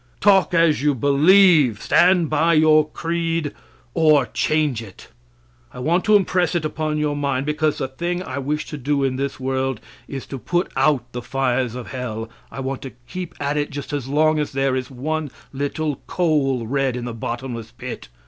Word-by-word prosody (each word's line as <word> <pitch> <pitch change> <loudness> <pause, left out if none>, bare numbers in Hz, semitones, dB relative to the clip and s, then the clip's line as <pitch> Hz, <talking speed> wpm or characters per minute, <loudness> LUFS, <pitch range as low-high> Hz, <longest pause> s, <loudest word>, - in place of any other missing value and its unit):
Talk 190 -4 +4
as 165 -5 +3
you 145 -1 +2
believe. 145 - +5
Stand 180 -2 +4
by 165 +3 +2
your 155 0 +5
creed 165 -1 -2 0.4
or 155 -5 +4
change 150 -3 0
it. 100 -5 -13 0.6
I - - -13
want 165 +8 +1
to 215 - +5
impress 180 -3 +2
it 165 -3 0
upon 155 0 -2
your 150 -1 0
mind, 140 -2 -1
because 150 0 0
the 135 - -2
thing 175 +7 -3
I 135 -5 -5
wish 150 +3 -2
to 150 - -5
do 140 +1 0
in 130 -1 0
this 140 0 -3
world 130 -2 -1 0.3
is 135 -2 -6
to 135 - -7
put 175 +7 -1
out 140 -6 +1
the 125 - -5
fires 125 -1 -1
of 125 -2 -7
hell 115 -3 -5 0.2
I 135 - -6
want 135 0 -4
to 135 - -8
keep 180 +4 -6
at 145 +1 -1
it 145 0 -1
just 145 +1 -7
as 140 -3 -3
long 155 +2 +2
as 150 - -2
there 135 -1 +1
is 130 -1 -3
one 150 +4 -3 0.2
little 145 +2 -2
coal 140 -8 +1
red 135 +1 0
in 120 - -5
the 120 - -4
bottomless 115 0 -5
pit. - - -8
145 Hz, 185 wpm, -21 LUFS, 130-155 Hz, 0.6 s, believe